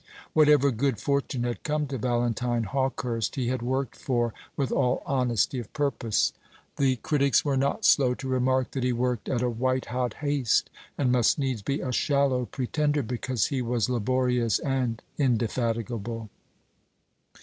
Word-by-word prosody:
Whatever 150 -2 +5
good 130 +1 0
fortune 140 -3 -1
had 120 -1 -3
come 150 0 -1
to 135 -1 -4
Valentine 120 0 0
Hawkehurst 125 -1 -1
he 125 -3 -1
had 130 -1 -1
worked 130 +1 -2
for 120 -3 -1 0.2
with 135 -2 -1
all 125 +1 +1
honesty 125 -2 +1
of 115 - -8
purpose. 135 -7 0 0.4
The 135 -2 +3
critics 140 +3 +2
were 140 -2 +1
not 140 +10 0
slow 125 -3 +5
to 135 - -7
remark 130 0 +1
that 130 - -3
he 125 0 +1
worked 125 -1 -1
at 125 -1 0
a 125 - +2
white 130 +2 0
hot 125 -3 -1
haste, 145 -5 +1 0.3
and 130 -3 +2
must 125 -2 +3
needs 130 -6 -1
be 140 +8 -2
a 130 - -2
shallow 135 -2 +1
pretender 145 +2 0
because 125 +1 -1
he 130 - 0
was 120 0 0
laborious 125 -1 +1
and 130 -4 -2 0.2
indefatigable. 115 -3 -1
125 Hz, 155 wpm, -27 LUFS, 120-135 Hz, 0.4 s, Whatever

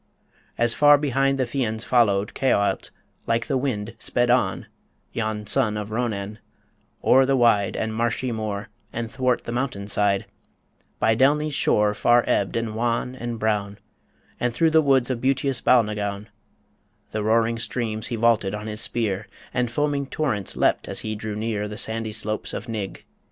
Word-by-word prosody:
As 120 -1 +3
far 145 +2 +6
behind 135 -1 +1
The 130 - +1
Fians 115 -3 -2
followed, 105 -5 +2
Caoilte, 110 -6 +1 0.4
like 115 0 +1
the 135 - -1
wind, 115 -5 -2
Sped 120 0 +1
on 125 - +1 0.5
yon 110 -2 -2
son 105 +1 +2
of 105 0 -5
Ronan 110 -3 -3 0.6
o'er 135 +1 +6
the 135 - +3
wide 105 -6 +3
And 110 0 -2
marshy 120 +2 -1
moor, 110 -1 -4 0.2
and 115 0 -4
'thwart 125 -2 0
the - - -5
mountain 120 -5 -3
side, 100 -1 +1 0.7
By 110 - +2
Delny's 150 +4 +2
shore 105 -5 +2
far 120 +3 +4
ebbed, 100 - 0
and 115 -1 -2
wan, 120 +2 -1
and 120 -2 -5
brown, 105 -2 -1 0.6
And 125 - 0
through 160 +4 +3
the 160 0 +5
woods 135 -3 +3
of 120 -2 -3
beautous 135 -1 0
Balnagown: 105 -3 +1 0.8
The 110 - -2
roaring 115 +2 +2
streams 110 -2 -2
he 120 - -3
vaulted 110 -3 +2
on 105 0 -6
his 110 0 -4
spear, 110 -4 -1 0.3
And 125 -1 0
foaming 140 +2 -1
torrents 125 -11 -2
leapt, - - +2
as - - -2
he 110 - -3
drew 105 0 -5
near 105 -1 -2
The 105 0 -7
sandy 110 0 -1
slopes 105 0 -3
of - - -5
Nigg. 105 -5 -5
115 Hz, 165 wpm, -24 LUFS, 105-125 Hz, 0.8 s, far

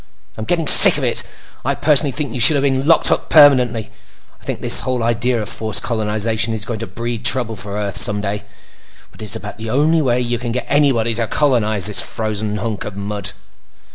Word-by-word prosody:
"I'm 110 - -8
getting 165 +3 -3
sick - - +9
of - - -6
it! - - +1 0.4
I - - -3
personally 145 -1 +2
think 140 -3 -6
you 125 - -7
should 140 +6 +8
have 140 - -2
been 135 0 -2
locked 165 - +4
up—permanently. 125 -7 +1 0.5
I - - -25
think - - -7
this - - +3
idea 120 -1 -2
of - - -5
forced 110 -2 -1
colonization 110 0 -1
is 110 -1 -1
going 115 -3 -7
to 115 - -8
breed 120 0 -7
trouble 120 -1 0
for 100 0 -7
Earth 100 -2 -5
someday, 105 0 +1 0.7
but - - -17
it - - -8
is 105 - +2
about 105 +1 -10
the 110 0 -7
only 155 +6 0
way 125 -3 -2
you 120 -1 -4
can 120 -1 -6
get 125 - -5
anybody 135 -6 -1
to 115 0 -1
colonize 110 -10 0
this 100 -2 +6
frozen 110 0 -4
hunk 105 -1 -6
of 100 -2 -10
mud. 100 -1 -5
115 Hz, 200 wpm, -15 LUFS, 105-130 Hz, 0.7 s, sick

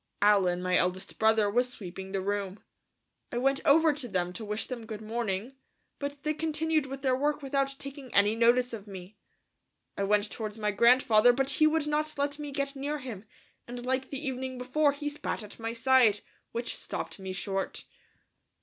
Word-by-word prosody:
Allen, 185 -4 +4
my 185 0 +1
eldest 180 +2 -1
brother, 220 -1 +4
was 245 +5 +1
sweeping 190 -4 -8
the 195 -1 -1
room. 200 0 -2 0.7
I 240 - -3
went 270 +2 +2
over 315 +2 +6
to 280 -3 -5
them 180 -4 -1
to 220 - -7
wish 210 +1 -2
them 235 -3 -7
good 215 -2 -6
morning, 220 +1 -3 0.5
but 285 0 -5
they 305 - 0
continued 315 -1 0
with 270 +1 -7
their 260 -2 +3
work 290 +2 0
without 275 0 0
taking 275 -2 -9
any 205 +2 +4
notice 240 +2 +3
of 210 -2 -7
me. 195 +1 -10 0.8
I - - -3
went 205 +1 +2
towards 215 -1 -5
my 210 -1 0
grandfather, 235 +1 +5
but 270 +2 +1
he 310 +3 +4
would 310 -1 +1
not 300 0 -1
let 285 +1 -1
me 295 -1 -5
get 280 0 -2
near 285 +2 -2
him, 235 -7 -8 0.4
and 245 0 -7
like 260 +1 -1
the 280 +2 -5
evening 260 -1 -3
before, 285 +4 +2
he 290 +1 -5
spat 295 -5 -3
at 210 - -11
my 225 0 -3
side, 230 -3 +4 0.3
which 235 +1 -3
stopped - - -5
me 190 -1 -5
short. 195 +1 -3
245 Hz, 185 wpm, -29 LUFS, 205-275 Hz, 0.8 s, over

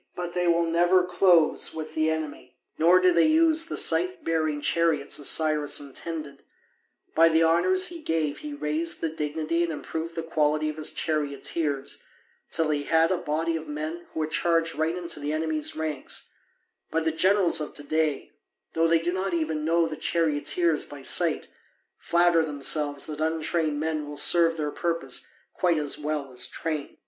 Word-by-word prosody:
But 175 -1 -5
they 180 -1 0
will 170 0 +3
never 175 +2 +3
close 180 -2 +2
with 155 -1 -6
the 155 0 +1
enemy. 150 -5 -5 0.2
Nor 175 +3 +5
do 185 0 +4
they 170 -1 +4
use 320 +1 +4
the - - -5
scythe 370 -2 +2
bearing 155 -2 -1
chariots 155 -2 0
as 145 - +1
Cyrus 155 -2 +1
intended. 145 0 -7 0.7
By 165 +1 +5
the 160 0 +3
honours 365 - +3
he 340 -2 -9
gave 160 - -2
he 300 - -7
raised 165 - 0
the 165 - -1
dignity 155 +2 -2
and 170 -1 0
improved 160 +2 -6
the 165 - -3
quality 155 -1 0
of 155 - -6
his 155 - -2
charioteers 145 -1 -2 0.5
till 160 -2 0
he 145 -1 -2
had 165 +1 +3
a 185 - +1
body 165 +1 -2
of 160 -1 -6
men 155 +3 -5
who 160 - -4
would 155 0 -3
charge 165 -1 +1
right 160 +3 -1
into 170 -3 -4
the 145 +1 -3
enemy's 155 -1 -2
ranks; 155 -3 -4 0.6
but 160 0 -1
the 160 - +2
generals 185 0 +3
of 150 - -6
to 145 - -5
day, 155 -1 -1 0.4
though 165 0 +2
they 165 0 +4
do 170 +2 -2
not 185 -1 -2
even 155 -2 -2
know 165 +1 +2
the 160 -1 -4
charioteers 160 +1 0
by 145 -2 -10
sight, 165 +2 +2 0.5
flatter 170 -1 +3
themselves 145 -1 +1
that 155 -1 -4
untrained 160 -1 -1
men 155 -1 -2
will 145 - -8
serve 165 +2 +5
their 150 -1 -2
purpose 165 -7 -3 0.3
quite 175 -3 +1
as 150 -1 -1
well 150 -2 -3
as 125 0 -3
trained. 155 -3 -5
160 Hz, 175 wpm, -26 LUFS, 150-170 Hz, 0.7 s, Nor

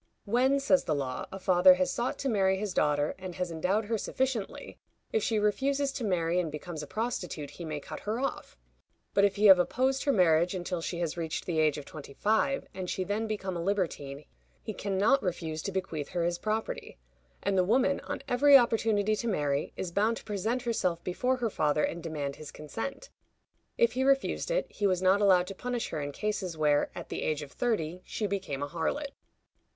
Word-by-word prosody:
When, 255 +6 +3
says 275 0 +3
the 155 - +1
law, 130 -3 -3
a 195 - -5
father 185 -1 +6
has 185 0 0
sought 240 +2 -2
to 275 - -3
marry 190 -5 +2
his 205 -1 -3
daughter, 150 -2 +1
and 185 -2 -7
has 180 -1 -3
endowed 185 +7 0
her 225 +1 -1
sufficiently, 255 -4 -3 0.3
if 450 - +2
she 225 - 0
refuses 275 +7 +1
to 270 - -5
marry 175 -4 +1
and 165 -4 -1
becomes 155 +1 -6
a 150 - -7
prostitute, 180 - -3
he 170 - -8
may 155 -2 -4
cut 155 +2 -8
her 215 +3 -3
off; 275 - -4 0.6
but 200 - +5
if 200 -1 +1
he 210 +1 +2
have 190 -3 +9
opposed 260 +9 +1
her 280 - +4
marriage 175 -3 +3
until 180 -1 -3
she 170 - -3
has 170 0 -2
reached 160 -2 -3
the 165 -3 -1
age 155 -1 +3
of 145 - -7
twenty 140 -2 -10
five, 220 +6 +1
and 185 -2 -5
she 185 - -1
then 210 +4 -2
become 195 -4 -3
a 170 - -3
libertine, 160 -7 -2 0.4
he - - -4
can 195 -1 -3
not 235 +8 +4
refuse 165 -4 -3
to 195 - -3
bequeath 175 -6 -3
her 175 -1 -1
his 175 0 -1
property; 220 +1 -3 0.5
and 200 0 +1
the 185 - +4
woman, 265 +8 +2
on - - -6
every 280 +2 +7
opportunity 220 -3 +2
to 235 - -3
marry, 145 -8 0
is 180 - -3
bound 215 +5 +1
to - - -10
present 220 +5 -2
herself 185 -8 -1
before 250 +8 0
her 240 -3 -1
father 150 -2 +1
and 170 - -2
demand 150 -4 -4
his 155 -2 -9
consent. 225 - -6 0.7
If 235 - +4
he 260 +2 -1
refused 275 - +1
it, - - +1
he 205 - 0
was 185 -1 0
not 190 +2 +4
allowed 185 -3 +5
to 195 - -6
punish 245 +4 -3
her 155 - -3
in 145 0 -4
cases 190 0 -3
where, 150 -1 +2
at - - -7
the - - -4
age 155 -1 -1
of 140 - -11
thirty, 180 -8 -1
she 215 - -3
became 185 -9 -3
a - - -2
harlot. 175 - -2
190 Hz, 210 wpm, -29 LUFS, 165-225 Hz, 0.7 s, have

